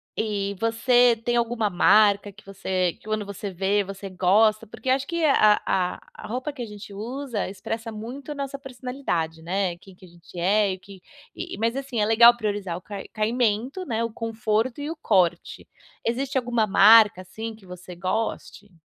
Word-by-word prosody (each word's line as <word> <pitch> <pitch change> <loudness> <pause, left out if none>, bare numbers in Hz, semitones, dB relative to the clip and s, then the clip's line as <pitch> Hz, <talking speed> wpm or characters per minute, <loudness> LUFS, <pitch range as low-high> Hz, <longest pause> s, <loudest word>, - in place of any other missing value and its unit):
E 200 -2 -2
você 240 +1 +4
tem 240 0 0
alguma 230 -2 0
marca 205 +2 +4
que 205 - -18
você 185 -2 -1
que - - -26
quando 215 -1 -2
você 200 0 -6
vê 195 +3 +1
você 195 0 -8
gosta? 210 +4 +3
Porque 230 +4 -7
acho 265 +1 +2
que 340 -1 -2
a 215 -8 +5
a 180 -1 0
a 215 - -10
roupa 255 +6 -3
que 270 -3 -9
a - - -3
gente 210 -1 -11
usa 240 +2 -4
expressa 225 +3 -5
muito 245 +7 -8
a - - -5
nossa 275 0 -4
personalidade, 250 - -4
né, 180 0 -1
quem 190 0 -17
que 185 - -16
a - - -15
gente 175 +1 -13
é, 200 +2 +2
o 185 - -8
que 195 -1 -14 0.3
e, 350 - -6
mas, 230 +2 0
assim, 270 -4 -4
é 210 - +3
legal 235 +2 +7
priorizar 205 -6 -3
o - - -11
cai 200 0 -8
caimento, 235 - -1
né, 230 -3 -1
o 230 - -3
conforto 225 +3 -2
e 295 - -4
o 330 - -4
corte. 180 - 0 0.4
Existe 265 +4 -1
alguma 240 -3 +1
marca, 210 -1 +6
assim, 220 +4 -7
que 205 -3 -19
você 180 0 -10
goste? 200 +2 -4
215 Hz, 190 wpm, -24 LUFS, 195-240 Hz, 0.4 s, legal